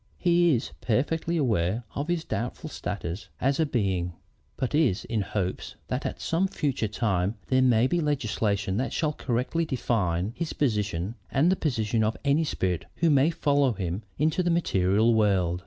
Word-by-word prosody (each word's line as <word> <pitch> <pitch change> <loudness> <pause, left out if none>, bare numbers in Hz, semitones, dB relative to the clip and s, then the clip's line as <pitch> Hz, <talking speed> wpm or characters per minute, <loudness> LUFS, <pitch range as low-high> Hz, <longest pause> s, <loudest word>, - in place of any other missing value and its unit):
He 175 -3 +4
is 115 - -3
perfectly 160 +8 0
aware 110 - +1
of 140 +2 -3
his 175 -2 0
doubtful 130 +5 -4
status 95 -1 -5
as 135 +3 +1
a 160 - +3
being, 95 -8 0 0.4
but 130 - -2
is 145 - +2
in 110 -2 -1
hopes 95 -1 -3
that - - -1
at - - -6
some 175 +4 +1
future 140 - -1
time 100 -2 0
there 130 0 +4
may 120 -2 +4
be 175 +6 +1
legislation 105 -9 0
that 130 - -1
shall 155 -2 0
correctly 130 +6 -1
define 105 - -1
his 170 -1 -3
position 105 - -1 0.2
and 155 +7 +3
the - - +3
position 115 - 0
of 110 +1 0
any 140 +3 +3
spirit 90 - -1
who 165 -2 +2
may 140 +2 +4
follow 145 -5 +2
him 95 -1 -3 0.2
into 155 +4 +2
the 175 - 0
material 110 - +3
world. 95 -5 +2
120 Hz, 170 wpm, -27 LUFS, 100-150 Hz, 0.4 s, He